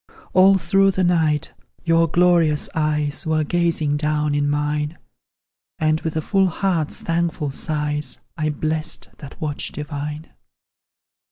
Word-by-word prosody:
All 190 +1 +6
through 195 +3 +3
the 190 -1 0
night, 160 -4 +1 0.3
your 165 -1 +3
glorious 170 -3 +3
eyes 150 -1 0
Were 155 -1 +2
gazing 165 -3 0
down 150 0 0
in 145 0 +1
mine, 150 +2 -1 0.8
And, 155 0 +1
with 160 -1 -3
a 155 - -1
full 195 +2 +2
heart's 175 -3 -1
thankful 165 -3 -1
sighs, 150 0 -2 0.2
I 155 -1 -1
blessed 155 +2 -2
that 140 -2 -11
watch 150 -2 -2
divine. 150 +1 -6
155 Hz, 125 wpm, -21 LUFS, 150-170 Hz, 0.8 s, All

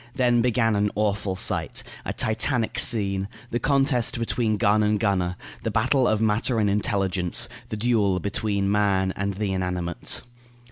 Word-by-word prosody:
Then 120 -2 +3
began 115 -2 +2
an 105 0 +2
awful 100 -2 0
sight; 95 - -2 0.2
a - - -2
Titanic 110 +2 0
scene; 100 -4 +1 0.2
the 120 - 0
contest 135 -3 +2
between 115 -2 0
gun 105 +1 +3
and 105 0 +2
gunner; 95 -5 0 0.3
the - - -2
battle 130 +3 +2
of 110 - +2
matter 110 +2 +1
and 105 -2 +2
intelligence; 100 +1 0 0.2
the 110 - -4
duel 105 -4 +2
between 100 0 -1
man 95 -2 +2
and 100 0 -2
the 100 -1 -2
inanimate. 90 -2 -2
105 Hz, 150 wpm, -24 LUFS, 100-115 Hz, 0.3 s, Then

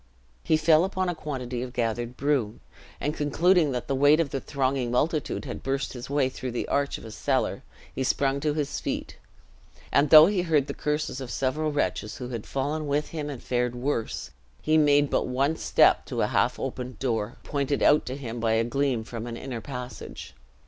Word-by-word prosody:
He 160 - +3
fell 155 +1 +5
upon 185 -1 -1
a - - 0
quantity 130 -6 -4
of 125 0 -6
gathered 120 0 -2
broom; 130 -6 0 0.4
and 150 - -1
concluding 160 +2 +3
that 125 - -3
the 140 - 0
weight 145 +3 +5
of 160 -4 0
the 135 - -2
thronging 135 -3 -1
multitude 150 +4 0
had - - -6
burst 135 0 -2
his 125 0 -8
way 140 -2 +2
through 130 -1 -5
the 120 - -2
arch 140 0 0
of - - -12
a 110 - -8
cellar, - - -1 0.3
he 130 - -2
sprung 135 +1 +1
to 150 0 0
his 150 -3 -2
feet; - - -4 0.7
and 145 +1 +3
though 155 0 +11
he 195 0 +1
heard 155 -5 +2
the - - -5
curses 150 -3 -2
of 130 - -6
several 145 +5 -1
wretches, 145 -7 -1
who 125 -1 -6
had 115 -4 -6
fallen 145 +3 -2
with 145 +1 0
him 150 -3 -4
and 140 -4 -7
fared 125 -1 -1
worse, 120 -2 -3 0.3
he 155 - +1
made 145 -2 +4
but - - +1
one 135 +5 +1
step - - +4
to - - -1
a - - +2
half - - +2
opened 125 -2 -5
door, 115 -5 -2
pointed 140 -1 -1
out 150 - +5
to 130 +2 -4
him 120 -4 -6
by 115 -1 +1
a 110 +1 +3
gleam 130 -1 0
from 115 0 -6
an 115 -1 -5
inner 125 -3 -5
passage. 125 -2 -8
135 Hz, 205 wpm, -26 LUFS, 125-150 Hz, 0.7 s, though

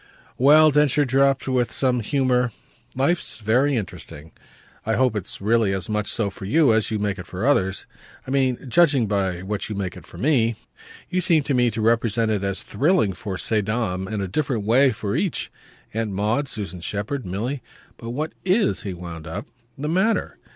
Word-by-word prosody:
"Well," 155 +4 +7
Densher 150 0 +3
dropped 135 +1 +2
with 125 -2 +1
some 125 -2 +1
humour, 125 +1 +1 0.4
"life's 140 +7 0
very 125 +6 +2
interesting! 80 -7 -6 0.5
I 110 - 0
hope 125 -2 +2
it's 100 -4 -4
really 110 -1 +2
as 95 -1 -3
much 105 -1 -1
so 105 -4 0
for 95 - -9
you 135 +3 +4
as 110 -1 +1
you 110 - -1
make 100 -2 -2
it 90 - -8
for 95 +5 -4
others; 95 -9 +1 0.4
I - - -6
mean 130 -2 +2
judging 145 -3 +4
by 95 -3 -1
what 100 +2 -3
you 105 - -4
make 95 -3 -3
it - - -12
for - - -12
me. 120 -5 +2 0.6
You 185 - +1
seem 160 -3 +3
to 140 - -1
me 125 -1 +3
to 110 0 -4
represent 115 0 +2
it 100 -2 -1
as 100 -1 -3
thrilling 140 - +1
for 95 +1 -5
ces 110 +2 0
dames, 100 -3 -2
in 105 -2 -2
a 95 - -2
different 125 0 -1
way 130 +6 +4
for 105 -2 -3
each: 190 -6 -1 0.4
Aunt 110 0 -1
Maud, 105 +8 0
Susan 95 -7 -4
Shepherd, 105 +9 -3
Milly. 110 +9 -3 0.4
But 115 - -8
what 150 +6 -3
IS," 195 +3 +2
he 95 -3 -5
wound 85 -2 -8
up, 95 +7 -5 0.3
"the 145 +2 -4
matter? 190 +8 0
115 Hz, 190 wpm, -23 LUFS, 100-135 Hz, 0.6 s, Well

